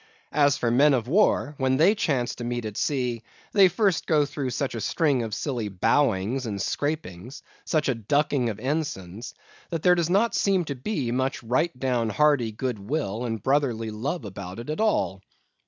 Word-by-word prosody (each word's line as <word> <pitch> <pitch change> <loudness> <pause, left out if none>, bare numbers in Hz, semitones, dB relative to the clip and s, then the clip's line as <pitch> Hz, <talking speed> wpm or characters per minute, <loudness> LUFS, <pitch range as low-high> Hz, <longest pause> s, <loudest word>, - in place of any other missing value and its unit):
As 145 -2 +3
for 120 - 0
Men 140 +4 +5
of 120 -2 -2
War, 155 -3 +2
when 130 0 +2
they 170 +8 +5
chance 140 - 0
to 120 - -7
meet 120 -1 -3
at 105 -1 -5
sea, 125 -4 -1 0.3
they 195 -2 +6
first 185 0 0
go 150 -3 +3
through 140 -2 -4
such 130 +3 -2
a 115 - -4
string 140 - +1
of 110 -2 -3
silly 120 -7 -3
bowings 115 +3 +1
and 100 -2 -4
scrapings, 130 - -4 0.2
such 155 -2 0
a 135 - +2
ducking 130 +2 0
of 110 -1 -5
ensigns, 120 - -4 0.3
that 165 -2 -3
there 180 - +6
does 170 -2 0
not 205 +6 +2
seem 190 -3 +2
to 145 - -3
be 130 - -2
much 130 +1 -1
right 125 +5 0
down 125 -4 0
hearty 140 -1 +2
good 120 0 -3
will 115 0 -3
and 115 -3 -4
brotherly 125 -6 +1
love 130 +6 -3
about 95 -1 -7
it 120 +6 -5
at 155 - -2
all. 150 - +1
130 Hz, 190 wpm, -25 LUFS, 115-150 Hz, 0.3 s, they